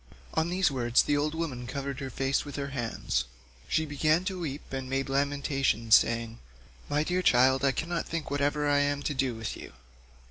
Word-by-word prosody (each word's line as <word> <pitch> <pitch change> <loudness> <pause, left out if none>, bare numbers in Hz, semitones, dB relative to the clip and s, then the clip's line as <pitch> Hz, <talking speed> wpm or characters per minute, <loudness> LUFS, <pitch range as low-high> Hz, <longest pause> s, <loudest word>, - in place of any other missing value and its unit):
On 160 +1 +1
these 180 -2 +2
words 120 -3 +3
the 145 - +1
old 150 +2 0
woman 135 -7 -4
covered 140 0 -4
her 135 - -4
face 135 +2 0
with 145 - -8
her 140 -1 -3
hands; 115 - -2 0.4
she 160 0 +1
began 155 +4 +1
to 190 -1 -3
weep 145 -4 -6
and 130 -1 -4
made 135 0 -1
lamentation 135 -4 0
saying, 115 +1 +4 0.5
"My 145 +1 +1
dear 180 +3 0
child, 130 -3 +4
I 135 - +4
cannot 165 +6 -3
think 165 -4 -4
whatever 145 +1 +1
I 145 0 +3
am 145 0 0
to 150 - -1
do 130 -3 0
with 110 -1 -4
you. - - -10
140 Hz, 190 wpm, -29 LUFS, 130-150 Hz, 0.5 s, saying